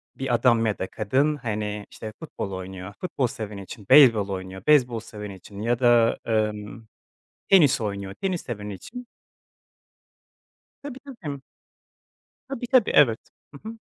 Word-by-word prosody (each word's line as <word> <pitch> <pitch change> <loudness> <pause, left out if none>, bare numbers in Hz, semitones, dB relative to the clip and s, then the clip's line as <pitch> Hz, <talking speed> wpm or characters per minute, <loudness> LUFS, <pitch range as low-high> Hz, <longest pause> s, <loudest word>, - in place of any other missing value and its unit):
bir 135 -2 -2
adam 115 -1 +3
ya 105 - -1
da 95 - -2
kadın, 135 +8 +1
hani, 105 -5 -4
işte, 110 -1 -8
futbol 110 -10 -6
oynuyor, 95 +1 -7
futbol 140 -8 -1
seveni 105 -6 -7
için, 100 +1 -11
beyzbol 115 -8 +7
oynuyor, 95 0 -6
beyzbol 125 -6 +4
seveni 105 -3 -9
için 100 +2 -11
ya 120 +2 0
da, 120 -2 +4
emm, 110 0 -2 0.6
tenis 160 -11 +5
oynuyor, 100 -2 -4
tenis 185 -3 -2
seveni 105 -4 -6
için. 245 - -10 1.8
Tabii, 270 -2 -8 0.2
tabii. 140 -4 -5 1.1
Tabii, 255 -3 -5
tabii. 255 -4 +4
Evet. 115 -6 +5 0.3
Hı 180 +10 -9
hı. 225 - -9
115 Hz, 140 wpm, -25 LUFS, 105-140 Hz, 1.8 s, beyzbol